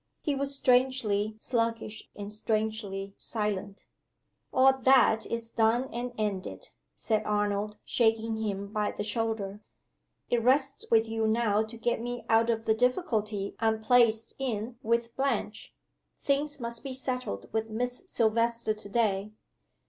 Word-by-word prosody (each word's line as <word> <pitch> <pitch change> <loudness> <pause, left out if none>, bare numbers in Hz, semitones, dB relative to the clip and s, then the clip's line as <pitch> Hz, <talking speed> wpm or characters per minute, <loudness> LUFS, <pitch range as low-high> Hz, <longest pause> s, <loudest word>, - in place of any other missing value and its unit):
He 295 - +1
was 275 0 -2
strangely 245 -6 +2
sluggish 230 -2 -2
and 205 0 -7
strangely 215 -2 -2
silent. 205 -2 -3 0.7
"All 265 0 +5
that 255 -4 +5
is 230 0 -4
done 230 +3 +1
and 245 +1 -3
ended," 210 - -3 0.3
said 215 -2 0
Arnold 210 0 -1
shaking 225 -1 +1
him 200 -2 -3
by 210 -1 0
the - - -4
shoulder. 215 -2 -2 0.7
"It 240 - +3
rests 270 +3 +2
with 225 0 +4
you 225 0 0
now 220 -2 +2
to 230 +1 -10
get 230 0 -1
me 245 0 -5
out 225 +1 +4
of 225 -1 0
the 220 - +4
difficulty 220 - 0
I'm 220 -1 +1
placed 225 -1 +4
in 235 -2 -3
with 230 0 0
Blanche. 265 -5 -2 0.5
Things 285 +1 0
must 235 -1 -4
be 270 -2 -4
settled 255 - -2
with 220 0 -1
Miss 245 +3 -2
Silvester 230 -3 +1
to 210 -1 -9
day." 205 -2 +1
225 Hz, 140 wpm, -29 LUFS, 215-245 Hz, 0.7 s, All